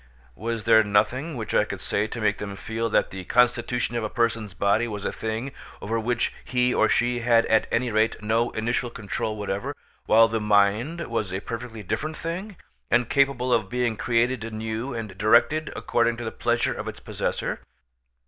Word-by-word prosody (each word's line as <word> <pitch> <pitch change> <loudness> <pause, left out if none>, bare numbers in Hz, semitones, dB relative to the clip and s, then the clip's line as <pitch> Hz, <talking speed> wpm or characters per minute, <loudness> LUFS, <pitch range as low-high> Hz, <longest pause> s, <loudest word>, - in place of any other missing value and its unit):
Was 115 - -4
there 110 0 +6
nothing 125 +9 +1
which 110 -2 -4
I - - +4
could - - -6
say 105 +1 -1
to 120 - -6
make 105 -2 +1
them 100 -1 -5
feel 115 +3 -3
that - - +2
the 95 -1 -6
constitution 120 0 +2
of 120 - -1
a 110 - -2
person's 115 -5 -1
body 100 +6 +2
was 105 -3 -5
a - - 0
thing 110 +4 -4 0.3
over 115 +3 -2
which 120 +1 0
he 125 0 +1
or - - +3
she 120 0 +2
had 115 -1 +4
had 110 - +3
at - - -19
any 120 0 +1
rate 110 +1 +2
no 110 +2 +1
initial 120 +2 -1
control 110 -1 -4
whatever, 105 +7 -3 0.3
while 115 +1 +7
the 115 0 -1
mind 105 +10 +2
was 110 -5 -2
a 95 - -2
perfectly 115 0 -6
different 155 - -3
thing, 180 +4 -5 0.3
and 120 -2 +2
capable 135 -3 +2
of 110 -5 +1
being 120 -2 0
created 120 +1 +1
anew 110 +3 -4
and 110 -6 -6
directed 120 +9 +3
according 115 0 +1
to 120 - -5
the 110 - -3
pleasure - - 0
of - - -6
its - - -6
possessor? - - -3
115 Hz, 190 wpm, -25 LUFS, 110-125 Hz, 0.3 s, while